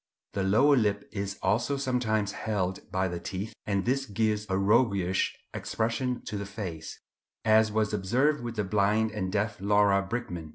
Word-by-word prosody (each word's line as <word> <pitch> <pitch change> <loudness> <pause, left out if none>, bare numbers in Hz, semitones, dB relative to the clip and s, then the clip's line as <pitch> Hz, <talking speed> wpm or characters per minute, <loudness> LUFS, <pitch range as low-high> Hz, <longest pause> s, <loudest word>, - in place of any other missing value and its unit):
The 100 - -1
lower 110 +10 +4
lip 105 -3 +1
is 100 -1 -4
also 120 +6 +1
sometimes 120 -6 0
held 95 -4 -3
by 95 -1 +1
the 85 -1 -4
teeth, 95 +5 -5
and 100 -2 0
this 135 +2 0
gives 105 0 0
a 95 - +1
roguish 100 -3 +2 0.2
expression 120 +2 -2
to 105 - -4
the 100 - -4
face, 95 -7 -6 0.5
as 110 0 +5
was 110 -1 0
observed 125 +9 +1
with 120 -1 -5
the 105 - 0
blind 105 +3 +2
and 95 -3 -3
deaf 105 0 -1
Laura 100 -1 +4
Bridgman. 90 -6 -5
105 Hz, 165 wpm, -28 LUFS, 100-115 Hz, 0.5 s, as